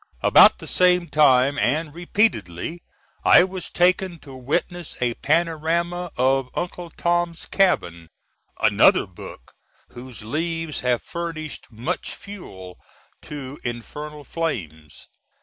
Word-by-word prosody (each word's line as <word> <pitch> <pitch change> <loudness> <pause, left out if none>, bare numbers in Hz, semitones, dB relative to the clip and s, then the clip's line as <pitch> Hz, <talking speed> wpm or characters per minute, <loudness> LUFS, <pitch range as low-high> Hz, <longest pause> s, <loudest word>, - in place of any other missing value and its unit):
About - - +7
the - - -10
same 180 -1 +3
time, 140 -2 +4 0.3
& - - -20
repeatedly, 170 - -1 0.4
I - - +7
was 185 -1 -5
taken 180 0 +1
to 135 -3 -12
witness 155 +6 -3
a 120 -1 0
panorama 170 +4 0
of 130 +1 +2
Uncle 175 0 -4
Tom's 175 0 -1
Cabin 85 - 0 0.5
another - - +4
book - - -12 0.4
whose 125 -2 -10
leaves 165 +5 -2
have 125 -1 0
furnished 165 -3 -6
much 115 +2 -4
fuel 95 - -11 0.4
to 145 -1 -8
infernal 150 +5 -6
flames. 80 - -5
155 Hz, 110 wpm, -23 LUFS, 125-175 Hz, 0.5 s, About